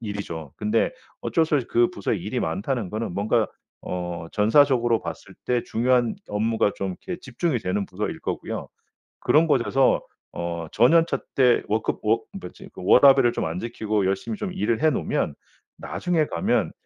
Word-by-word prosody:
일이죠. 100 Hz, -, -6 dB
근데 105 Hz, -, +1 dB, 0.3 s
어쩔 160 Hz, -1 st, +1 dB
수 155 Hz, -, 0 dB
없이 130 Hz, -5 st, +1 dB
그 120 Hz, 0 st, +3 dB
부서에 -, -, -2 dB
일이 -, -, -3 dB
많다는 100 Hz, +5 st, -2 dB
거는 110 Hz, -3 st, -3 dB
뭔가 110 Hz, +2 st, +1 dB, 0.3 s
어 90 Hz, -2 st, -5 dB
전사적으로 120 Hz, +1 st, +3 dB
봤을 -, -, -8 dB
때 125 Hz, -1 st, +1 dB
중요한 120 Hz, 0 st, +1 dB
업무가 110 Hz, 0 st, +1 dB
좀 95 Hz, -, -2 dB
이렇게 180 Hz, -2 st, -5 dB
집중이 130 Hz, 0 st, -2 dB
되는 95 Hz, +2 st, -1 dB
부서일 100 Hz, +3 st, -4 dB
거고요. -, -, -4 dB, 0.5 s
그런 160 Hz, +2 st, +4 dB
곳에서 135 Hz, -2 st, +2 dB, 0.3 s
어 85 Hz, -1 st, -4 dB
저년차 165 Hz, +9 st, +4 dB, 0.2 s
때 125 Hz, -3 st, +4 dB
워크 110 Hz, +1 st, 0 dB
워 110 Hz, +2 st, +2 dB, 0.2 s
뭐지 -, -, -11 dB
그 -, -, -10 dB
워라밸을 135 Hz, +2 st, +6 dB
좀 -, -, -2 dB
안 80 Hz, +3 st, -3 dB
지키고 110 Hz, -4 st, -1 dB
열심히 100 Hz, -, -2 dB
좀 195 Hz, -2 st, -4 dB
일을 120 Hz, -11 st, -1 dB
해 160 Hz, -, +5 dB
놓으면 135 Hz, -, -1 dB, 0.4 s
나중에 175 Hz, -4 st, -1 dB
가면 85 Hz, -, 0 dB
115 Hz, 330 characters per minute, -24 LUFS, 100-135 Hz, 0.5 s, 워라밸을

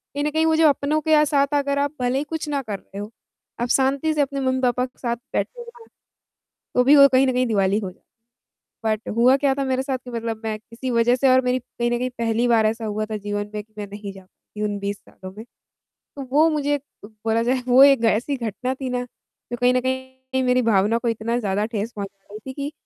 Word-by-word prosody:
कहीं 290 Hz, -, -1 dB
न 300 Hz, -, 0 dB
कहीं 320 Hz, +1 st, +1 dB
वो 320 Hz, 0 st, +3 dB
जो 320 Hz, -1 st, +5 dB
अपनों 285 Hz, +2 st, 0 dB
के 305 Hz, 0 st, +4 dB
साथ 280 Hz, -1 st, +2 dB
अगर 280 Hz, 0 st, +1 dB
आप 285 Hz, 0 st, 0 dB
भले 250 Hz, +2 st, +1 dB
ही -, -, -2 dB
कुछ 320 Hz, 0 st, -5 dB
ना 285 Hz, -1 st, -1 dB
कर 210 Hz, -6 st, -5 dB
रहे 195 Hz, -, -14 dB
हो, 205 Hz, -, -6 dB, 0.5 s
आप 240 Hz, -, 0 dB
शांति 275 Hz, +5 st, +2 dB
से 300 Hz, -, +1 dB
अपने 275 Hz, 0 st, -1 dB
मम्मी-पापा 255 Hz, -1 st, +1 dB
के 255 Hz, -, -17 dB
साथ 235 Hz, -2 st, -1 dB, 0.2 s
बैठे -, -, -2 dB
हो, 470 Hz, -1 st, -13 dB, 0.9 s
तो 250 Hz, -, +5 dB
भी 280 Hz, +4 st, +6 dB
वो 280 Hz, 0 st, +9 dB
कहीं 260 Hz, +1 st, +4 dB
न 260 Hz, -, +1 dB
कहीं 250 Hz, 0 st, +1 dB
दिवाली 200 Hz, -2 st, +2 dB
हो 190 Hz, -4 st, -5 dB, 0.9 s
बट 215 Hz, 0 st, -1 dB
हुआ 250 Hz, +3 st, +5 dB
क्या 275 Hz, -1 st, +2 dB
था 275 Hz, -, -1 dB
मेरे 260 Hz, 0 st, 0 dB
साथ 265 Hz, -1 st, -2 dB
कि 250 Hz, -, -8 dB
मतलब 230 Hz, -1 st, -4 dB
मैं 215 Hz, -1 st, -2 dB
किसी 230 Hz, +4 st, -7 dB
वजह 235 Hz, +1 st, +3 dB
से 265 Hz, +1 st, +2 dB
और 260 Hz, -, +5 dB
मेरी 250 Hz, +1 st, +1 dB
कहीं 240 Hz, 0 st, -3 dB
न 240 Hz, -, +1 dB
कहीं 255 Hz, 0 st, -1 dB
पहली 230 Hz, +1 st, +1 dB
बार 230 Hz, -2 st, +4 dB
ऐसा 225 Hz, +1 st, -3 dB
हुआ 215 Hz, 0 st, -2 dB
था 215 Hz, -, -1 dB
जीवन 205 Hz, 0 st, -4 dB
में 210 Hz, -, -3 dB
कि 215 Hz, -, -36 dB
मैं 205 Hz, -, -5 dB
नहीं 200 Hz, 0 st, -8 dB
जा 195 Hz, -, -12 dB
पाती 210 Hz, +3 st, -13 dB
उन 205 Hz, -1 st, -1 dB
20 200 Hz, 0 st, -3 dB
सालों 185 Hz, -1 st, -12 dB
में। 220 Hz, -, -7 dB, 0.5 s
तो 280 Hz, -, -12 dB
वो 310 Hz, +3 st, +5 dB
मुझे 290 Hz, -1 st, 0 dB, 0.3 s
बोला 220 Hz, +1 st, -2 dB
जाए, 250 Hz, +2 st, +1 dB
वो 250 Hz, +2 st, +7 dB
एक 275 Hz, -4 st, +5 dB
ऐसी 230 Hz, +6 st, +1 dB
घटना 250 Hz, +2 st, -3 dB
थी 265 Hz, -1 st, -5 dB
ना, 250 Hz, 0 st, -1 dB
जो 240 Hz, 0 st, -12 dB
कहीं 250 Hz, 0 st, +4 dB
न 255 Hz, -, +3 dB
कहीं 260 Hz, 0 st, -4 dB
मेरी 250 Hz, 0 st, +3 dB
भावना 220 Hz, 0 st, +2 dB
को 235 Hz, -, -2 dB
इतना 230 Hz, +1 st, -1 dB
ज़्यादा 205 Hz, -1 st, -1 dB
ठेस 225 Hz, 0 st, -4 dB
पहुँचा 200 Hz, -1 st, -7 dB
रही 210 Hz, -, -8 dB
थी 265 Hz, -, -5 dB
कि 285 Hz, +1 st, -4 dB
250 Hz, 240 wpm, -22 LUFS, 220-275 Hz, 0.9 s, वो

